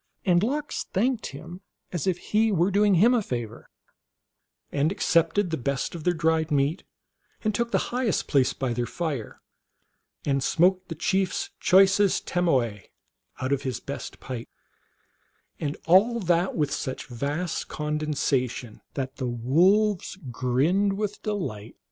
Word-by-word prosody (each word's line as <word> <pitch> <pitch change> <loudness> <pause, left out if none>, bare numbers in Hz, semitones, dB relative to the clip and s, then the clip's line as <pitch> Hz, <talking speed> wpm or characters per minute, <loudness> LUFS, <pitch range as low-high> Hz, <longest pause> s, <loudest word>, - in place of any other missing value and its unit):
And 175 -2 +4
Lox 290 +7 -2
thanked 235 +4 0
him 170 +6 -9 0.3
as 175 0 -3
if 185 -2 +2
he 215 +4 +1
were 180 0 +2
doing 205 0 +4
him 225 +8 +5
a 240 - +3
favor, 120 - -5 1.0
and 145 +3 +1
accepted 180 -1 +2
the 160 - 0
best 135 +2 -2
of 170 -3 -7
their 180 - +4
dried 160 0 +1
meat, 145 +4 +1 0.6
and 215 -1 +1
took 235 +3 0
the - - +2 0.2
highest 245 -5 0
place 135 -4 +3
by 130 -3 -2
their 120 0 -2
fire, 150 -10 -4 0.8
and 140 -1 +1
smoked 185 +5 +2
the 165 - -4
chief 190 +3 +1
s - - -3
choicest 195 +1 +4
tomawe 130 - +1 0.6
out 130 +1 -1
of 140 - 0
his 130 -3 -3
best 140 - -7
pipe, 125 -3 -6 1.1
and 145 -2 -3
all 205 +8 +5
that 175 -2 +1
with 150 -3 0
such 130 - -4
vast 145 +8 -3
condescension 145 -6 -2
that 135 -1 -4
the 130 - -2
wolves 175 - +2
grinned 145 - +1
with 210 +1 -3
delight. 120 - -4
165 Hz, 145 wpm, -26 LUFS, 135-195 Hz, 1.1 s, him